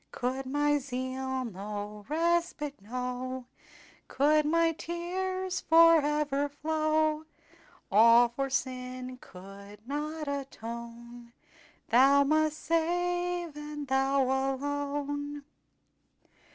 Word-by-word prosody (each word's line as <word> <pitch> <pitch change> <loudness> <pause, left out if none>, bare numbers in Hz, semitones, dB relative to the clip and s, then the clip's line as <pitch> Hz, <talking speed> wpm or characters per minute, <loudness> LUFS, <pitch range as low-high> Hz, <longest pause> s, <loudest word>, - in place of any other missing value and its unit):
"Could 260 +1 -3
my 290 +2 +2
zeal 260 0 -3
no 205 0 -7
respite 330 - 0
know, 250 +3 -4 0.6
Could 300 +2 +3
my 330 +1 +3
tears 365 +3 -3
forever 300 -3 +4
flow, 310 +1 0 0.7
All 230 +3 +7
for 270 +3 -3
sin 255 -1 -4
could 200 +3 -13
not 300 +2 -4
atone, 235 -3 -7 0.6
Thou 275 +4 +6
must 310 +1 +1
save, 350 +1 -1
and 295 -1 -6
Thou 270 +1 +2
alone." 285 +2 -2
280 Hz, 85 wpm, -29 LUFS, 250-310 Hz, 0.7 s, All